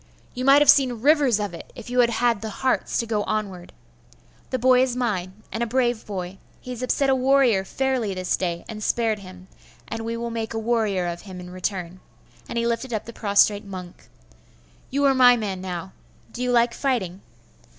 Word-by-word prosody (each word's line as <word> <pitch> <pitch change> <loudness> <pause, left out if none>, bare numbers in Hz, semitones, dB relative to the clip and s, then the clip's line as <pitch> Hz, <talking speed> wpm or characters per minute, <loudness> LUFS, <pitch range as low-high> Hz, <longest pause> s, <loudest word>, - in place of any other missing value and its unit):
'You 255 +1 -4
might 280 +2 +7
have - - +1
seen 250 -5 +1
rivers 280 -5 +4
of 205 -3 -3
it, 170 - -10
if 240 0 -9
you 250 - +1
had 240 -1 +5
had 235 -2 +1
the 220 - -4
hearts 260 +5 -1
to 235 - 0
go 215 -2 -1
onward. 195 -5 -3 0.8
The 255 - -1
boy 255 +1 +4
is 255 -2 +1
mine, 210 -5 -3
and 225 - -4
a 235 - 0
brave 240 -1 0
boy. 190 -2 -5 0.2
He 250 - -9
has 245 -1 -6
upset 270 +2 +1
a - - +5
warrior 260 -6 +3
fairly 250 -3 -1
this 185 -1 0
day, 170 -2 -3
and 215 -1 -7
spared 225 -2 0
him; 185 -1 -12 0.4
and 225 0 -5
we 230 +1 -3
will 235 0 -4
make 225 -1 -4
a - - -1
warrior 220 -5 0
of 175 0 -4
him 190 -3 -10
in 180 0 -9
return.' 185 -1 -4 0.5
And - - -4
he 235 - +1
lifted 235 +2 -2
up 215 - -2
the 235 - -9
prostrate 205 -1 +3
monk. 185 -3 -10 0.8
'You 280 +2 +1
are 275 - +5
my 250 -2 +6
man 195 -4 -4
now. 185 0 -5 0.4
Do 245 - -6
you 250 0 0
like 235 -1 +3
fighting? 205 -10 -2
225 Hz, 205 wpm, -24 LUFS, 190-250 Hz, 0.8 s, might